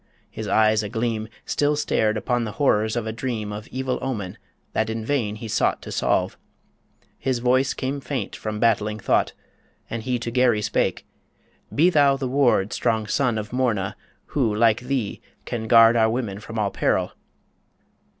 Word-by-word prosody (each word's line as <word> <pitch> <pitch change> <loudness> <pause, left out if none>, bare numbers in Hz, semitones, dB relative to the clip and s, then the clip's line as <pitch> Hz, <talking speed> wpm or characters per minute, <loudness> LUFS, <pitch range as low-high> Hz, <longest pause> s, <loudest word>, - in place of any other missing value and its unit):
His - - -6
eyes 110 0 +3
a 105 - -5
gleam 115 -1 -2 0.2
Still 145 +1 +1
stared 110 -7 +1
upon 120 +2 0
the 110 -2 -4
horrors 110 -4 +2
of 120 -2 -2
a 110 - -2
dream 110 -3 -4
Of 105 +1 -7
evil 130 0 -2
omen 105 -9 -4 0.3
that 110 0 0
in 110 0 -3
vain 115 -6 0
he 110 +1 -7
sought - - +1
To - - -8
solve... - - 0 0.8
His 130 -2 0
voice 130 +2 +2
came 140 +2 -3
faint 135 -1 -4
from 110 -1 -4
battling 110 -2 +2
thought, 105 - +1 0.6
As 115 -1 -3
he 125 -1 0
to 120 0 -4
Garry 120 -4 +3
spake - - 0 0.7
"Be 170 +5 +5
thou 140 -4 +4
the 135 -1 -2
ward 125 -7 +2
Strong 110 -2 0
son 125 -5 +1
of 105 +1 -5
Morna: 115 -7 0 0.3
who, 120 -7 0
like 110 0 +3
thee, 125 -4 -2 0.2
can 110 -2 -4
guard 115 0 +7
Our 110 -1 +4
women 110 -4 -2
from 115 +1 -8
all 105 -2 0
peril!" - - 0
115 Hz, 170 wpm, -23 LUFS, 110-130 Hz, 0.8 s, guard